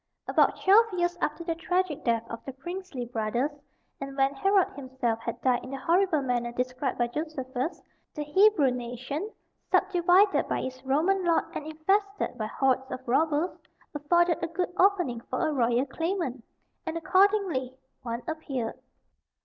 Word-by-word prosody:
About - - +3
twelve 425 +4 +6
years 350 -1 0
after 300 +3 -1
the 335 -1 -1
tragic 355 -1 -1
death 230 -1 +1
of 230 0 -7
the 270 - -7
princely 345 -2 -6
brothers, 235 +4 -1 0.5
and 275 0 -7
when 270 0 +3
Herod 390 +7 +3
himself 260 -4 -2
had 235 +1 -5
died 250 -1 +2
in 255 - -8
the 275 - -4
horrible 335 +1 +2
manner 240 -2 -1
described 250 +2 -2
by 240 - +2
Josephus, 265 +2 -4 0.4
the 300 - -3
Hebrew 305 -2 +4
nation, 250 - -4 0.4
subdivided 370 +2 +4
by - - -1
its 260 0 -6
Roman 330 +9 +2
lord, 335 -2 +3
and 300 - -5
infested 395 +6 0
by 215 - -3
hordes 265 +2 0
of 260 0 -7
robbers, 310 +6 +1 0.4
afforded 340 +3 +2
a - - +1
good 355 +2 -3
opening 355 - +2
for 335 - 0
a 310 - -1
royal 245 -1 +2
claimant; 325 -4 -3 0.4
and 325 0 -3
accordingly 350 -7 +2 0.2
one 235 0 -4
appeared. 275 -7 -4
290 Hz, 155 wpm, -28 LUFS, 255-350 Hz, 0.5 s, twelve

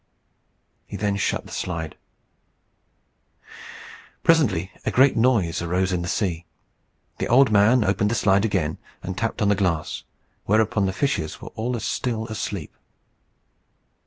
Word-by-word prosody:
He - - -6
then 105 -1 0
shut 100 - -1
the - - -12
slide. 85 -3 -4 2.3
Presently 115 - +3
a - - 0
great 135 +2 +4
noise 110 -10 +2
arose 90 +2 0
in 90 - 0
the 85 - -4
sea. 90 -2 -1 0.7
The - - -1
old 130 0 +5
man 110 +4 +5
opened 100 +1 +1
the 115 - 0
slide 100 -2 +3
again, 95 -8 -1 0.2
and 95 - -4
tapped 115 +1 -2
on 100 - +3
the - - +5
glass, 90 -5 -1 0.4
whereupon 105 -1 +2
the - - 0
fishes 90 - -1
were - - -9
all 120 +3 -3
as 115 - -5
still 115 -3 -2
as 110 - -4
sleep. 95 -8 -4
100 Hz, 145 wpm, -23 LUFS, 90-115 Hz, 2.3 s, old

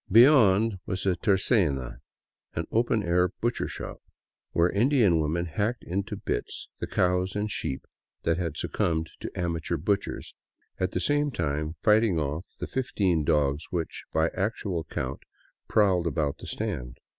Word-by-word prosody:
Beyond, 115 -4 +6
was 95 +1 -2
a 95 -2 +3
tercena, 85 - +1 0.6
an - - -1
open 115 -1 +2
air 90 +1 +3
butchershop, 120 +1 -3 0.5
where 85 +1 +3
Indian 110 - +4
women 80 +3 0
hacked 105 +8 -2
into 95 +3 -3
bits - - -4
the - - -3
cows 90 +1 +1
and 105 +1 -1
sheep 65 -7 -3 0.4
that 85 +1 +1
had 85 -4 -2
succumbed 80 -1 -1
to - - -5
amateur 85 -1 -1
butchers, 100 +6 -2 0.5
at 90 0 0
the - - 0
same 145 +7 +2
time 75 - -2
fighting 105 -4 +4
off 75 +4 -3
the - - -2
fifteen 95 -10 0
dogs 75 -1 +1
which, 85 -3 -3
by 80 +1 +2
actual 95 -4 -2
count, 65 +1 -4 0.5
prowled 95 -5 +3
about 80 -4 -1
the - - -9
stand. 75 - -4
90 Hz, 145 wpm, -27 LUFS, 80-105 Hz, 0.6 s, Beyond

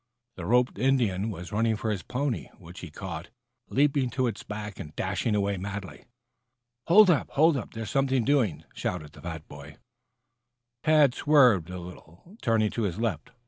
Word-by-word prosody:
The 85 -2 -6
roped 125 -1 +2
Indian 115 -6 +1
was 90 -3 -7
running 110 +1 +1
for 110 0 -2
his 100 -4 -2
pony, 125 - -2
which - - -12
he - - -8
caught, - - -7 0.4
leaping 140 -2 +2
to 130 +2 0
its 115 -4 -3
back 105 -1 -7
and 75 - -8
dashing 95 +4 -1
away 100 -1 0
madly. 95 0 -7 0.8
"Hold 190 +2 +7
up! 155 - +1
Hold 160 +2 +4
up! 130 - -5
There's 110 -2 -5
something 135 -3 +1
doing," 125 - +1
shouted 75 -5 -4
the - - -14
fat, 80 -2 -7
boy. 70 0 -11 1.1
Tad 150 -4 +5
swerved 125 - +4
a 90 - -6
little, 90 - -12
turning 110 -3 +2
to 115 - -3
his 95 -6 -1
left. 110 -4 -2
110 Hz, 170 wpm, -27 LUFS, 90-130 Hz, 1.1 s, Hold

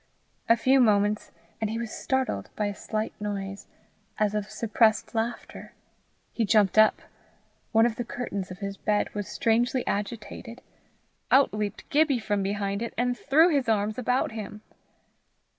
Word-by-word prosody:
A 230 - +6
few 260 +4 +4
moments 210 -3 +2 0.3
and 220 - 0
he 225 - -3
was 230 -2 -4
startled 260 - -2
by 210 - -1
a 205 - -2
slight 215 +2 -3
noise, 200 -1 -5 0.5
as 210 -1 +1
of 210 -1 -2
suppressed 220 0 +1
laughter. 230 +1 -4 0.6
He 230 - 0
jumped 210 -1 +3
up. 215 - +4 0.7
One 225 0 +5
of 235 -2 -1
the 245 - -2
curtains 210 -5 -5
of 185 - -8
his 200 0 -4
bed 210 -1 0
was 205 -1 -4
strangely 240 +1 +1
agitated. 230 +3 -5 0.7
Out 270 -3 +5
leaped 210 -1 -4
Gibbie 295 -2 +3
from 205 -2 -1
behind 200 +1 -2
it, 235 - -4
and 245 +1 +1
threw 315 +7 +4
his 275 -7 +1
arms 215 +1 0
about 250 +1 0
him. 215 -1 -7
215 Hz, 155 wpm, -27 LUFS, 205-240 Hz, 0.7 s, A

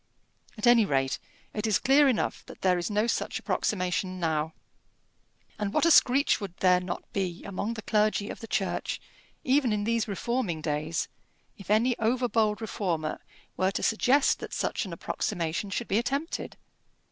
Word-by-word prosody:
At 215 - -2
any 240 -2 +7
rate, 135 -7 0 0.3
it 215 +1 -2
is 215 - +3
clear 280 +2 +5
enough 245 - -1
that - - -12
there 180 -2 +3
is 175 - -2
no 210 +1 +1
such 235 - -1
approximation 185 -1 -1
now. 160 -2 -1 1.0
And 205 -1 -1
what - - +3
a 335 - +5
screech 270 -3 +5
would 190 -3 -6
there 180 -1 +4
not 180 -1 -5
be 185 -3 -2
among 200 +3 -3
the 220 - -7
clergy 210 -1 +1
of - - -9
the 225 - -8
Church, - - -1 0.4
even 265 -2 +3
in 210 -1 0
these 230 +1 0
reforming 210 -4 -2
days, 155 +1 -2 0.5
if 195 - -13
any 230 +4 +3
over 245 +3 +1
bold 220 -2 +1
reformer 170 -8 -2 0.4
were 185 - +2
to 195 - -3
suggest 260 +5 +3
that - - -6
such - - -1
an 190 - -7
approximation 170 +3 -2
should 225 +4 -3
be 200 - +2
attempted? 280 +7 -3
210 Hz, 170 wpm, -28 LUFS, 180-235 Hz, 1.0 s, any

